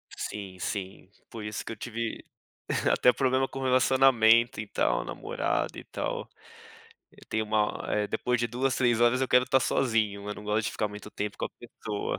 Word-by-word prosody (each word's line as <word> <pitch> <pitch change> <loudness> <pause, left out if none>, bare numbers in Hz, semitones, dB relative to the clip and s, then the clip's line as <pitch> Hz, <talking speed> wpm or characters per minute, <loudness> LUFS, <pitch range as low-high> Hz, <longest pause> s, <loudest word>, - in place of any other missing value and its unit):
Sim, 100 -3 -6
sim. 95 0 -5 0.2
Por 115 -2 -8
isso 105 -1 -4
que - - -5
eu - - -5
tive 115 +1 -4 0.7
até 125 - +5
problema 130 0 +1
com 135 0 -7
relacionamento 130 -3 +4
e 110 - -4
tal, 60 -10 +1
namorada - - -2
e - - -7
tal. - - -4 0.8
Eu - - -18
tenho 110 0 0
uma 105 0 0
depois 125 0 0
de 120 - +1
2, 125 +3 0
3 120 -3 +2
horas 120 +2 +4
eu 130 - 0
quero 125 0 +4
tá 135 - +4
sozinho, 110 -7 0
eu 105 - -3
não 105 - -10
gosto 105 +1 0
de - - -3
ficar 105 - -1
muito 105 +1 -9
tempo 105 0 -4
com - - -1
a - - -11
pessoa. 105 -2 -5
110 Hz, 185 wpm, -28 LUFS, 105-125 Hz, 0.8 s, até